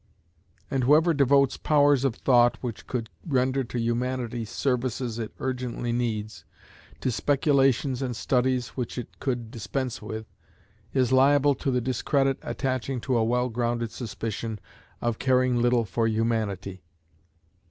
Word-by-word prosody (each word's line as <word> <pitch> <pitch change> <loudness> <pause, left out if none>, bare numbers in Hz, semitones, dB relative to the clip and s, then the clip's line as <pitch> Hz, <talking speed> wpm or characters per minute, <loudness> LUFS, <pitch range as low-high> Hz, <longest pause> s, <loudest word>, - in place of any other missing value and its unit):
And 135 -2 +1
whoever 160 +5 +5
devotes 140 -1 +3
powers 145 -3 +3
of 135 -5 +1
thought 120 -2 +4
which 120 -4 -6
could 120 -3 -3
render 130 -3 +1
to 120 - -5
Humanity 120 0 -1
services 120 0 -2
it 110 -2 -4
urgently 125 -2 -3
needs, 110 -6 -2 0.6
to 130 - 0
speculations 135 -1 +2
and 125 -3 -2
studies 125 0 +1
which 125 -1 -5
it 125 - -7
could 120 -4 -3
dispense 125 +2 -3
with, 110 +1 -6 0.7
is 130 -2 +1
liable 140 +2 +5
to 135 +1 -3
the 125 -1 +1
discredit 135 +2 0
attaching 130 -1 -2
to 130 0 0
a 115 - +3
well 125 +2 +1
grounded 120 -1 -1
suspicion 110 -2 -5 0.4
of 120 -2 -1
caring 130 -1 +2
little 120 -1 +3
for 115 +4 0
Humanity. 110 -4 -1
125 Hz, 135 wpm, -26 LUFS, 115-135 Hz, 0.7 s, whoever